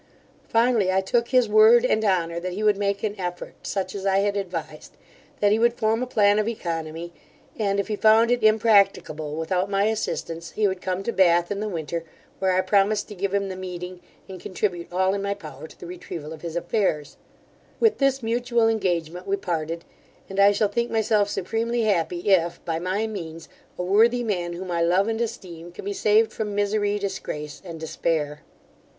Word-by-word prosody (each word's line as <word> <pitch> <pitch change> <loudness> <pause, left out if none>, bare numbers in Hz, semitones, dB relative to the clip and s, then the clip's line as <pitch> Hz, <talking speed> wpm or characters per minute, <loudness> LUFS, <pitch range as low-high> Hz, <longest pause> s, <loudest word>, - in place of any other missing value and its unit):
Finally, 230 -4 +2
I 190 - +3
took 235 +5 0
his 250 -2 +3
word 220 +3 +6
and 220 -3 +1
honour 170 -4 +1
that 180 +1 -4
he 210 +4 -4
would 210 -1 +4
make 200 +1 -1
an 210 -2 -1
effort, 175 -1 -5
such 190 -2 -3
as 200 - -6
I 195 -1 +2
had 200 +1 +1
advised; 175 -6 -5 0.5
that 205 -1 +3
he 215 - +3
would 235 +1 +3
form 225 +1 +1
a 255 - -2
plan 205 -3 +3
of 215 - 0
oeconomy, 165 -5 -4 0.5
and, 200 -2 +1
if 200 - -1
he 215 - -1
found 220 +3 +5
it 245 - +2
impracticable 200 -8 +3
without 180 +4 -1
my 200 0 +1
assistance, 170 -6 -3
he 215 -1 +2
would 190 -1 -3
come 185 +1 -2
to 235 - -1
Bath 175 -3 +3
in 200 - -2
the 215 0 -2
winter, 165 -2 -4 0.4
where 190 -1 +2
I 185 - +3
promised 200 +2 +1
to - - -7
give 200 0 -2
him 200 0 0
the 185 - -5
meeting, 180 -1 -7 0.3
and 190 -1 -9
contribute 180 -3 -3
all 190 +1 +1
in 200 - -2
my 200 0 -1
power 155 -6 -10
to - - -18
the - - -9
retrieval 170 -3 -7
of 155 - -11
his 170 -1 -6
affairs 175 -5 -1 0.6
With 450 -2 +3
this 275 -2 +1
mutual 235 0 +1
engagement 180 -5 -1
we 195 - +1
parted; 165 -2 -3 0.4
and 195 0 -5
I 200 +1 +7
shall 205 +1 +1
think 235 +3 -1
myself 215 -2 +2
supremely 230 +5 -1
happy, 180 -4 0
if, 175 -3 +2
by 165 -1 -1
my 185 +5 -1
means, 165 -7 -7 0.3
a 180 - -2
worthy 230 +6 +3
man, 175 -6 -2
whom 180 +1 -6
I 170 -1 0
love 180 +4 +3
and 225 0 -1
esteem, 175 -7 -6
can 175 - -10
be 200 - -2
saved 215 +2 +3
from 210 -2 -4
misery, 205 0 +1
disgrace, 170 -7 -5
and 170 -3 -8
despair. 155 -2 -2
195 Hz, 200 wpm, -24 LUFS, 175-215 Hz, 0.6 s, I